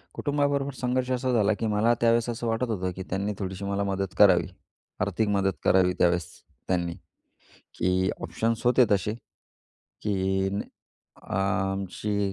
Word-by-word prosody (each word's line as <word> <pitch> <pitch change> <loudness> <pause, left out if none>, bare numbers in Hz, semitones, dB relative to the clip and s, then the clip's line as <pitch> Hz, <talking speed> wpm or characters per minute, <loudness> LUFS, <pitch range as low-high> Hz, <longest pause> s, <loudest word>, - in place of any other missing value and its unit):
कुटुंबाबरोबर 140 -1 0
संघर्ष 125 0 -1
असा 130 0 0
झाला, 110 -2 +3
की 110 +2 -2
मला 110 +3 +3
त्यावेळेस 115 0 +3
असं 120 0 -3
वाटत 115 +2 0
होतं, 95 -4 -1
की 95 - -5
त्यांनी 100 +3 -1
थोडीशी 95 0 -4
मला 100 0 -1
मदत 95 -1 -2
करावी, 95 -4 +6 0.5
आर्थिक 100 +3 0
मदत 95 -1 +1
करावी. 90 -1 +4
त्यावेळेस 85 -1 +3 0.4
त्यांनी. 85 -2 0 0.9
की 95 +1 +2
ऑप्शन्स 115 +1 -2
होते 125 +1 +6
तसे, 105 +1 +1 0.9
की 95 -1 0 0.7
अ, - - -20
आमची 95 +1 -1
100 Hz, 135 wpm, -26 LUFS, 95-115 Hz, 0.9 s, करावी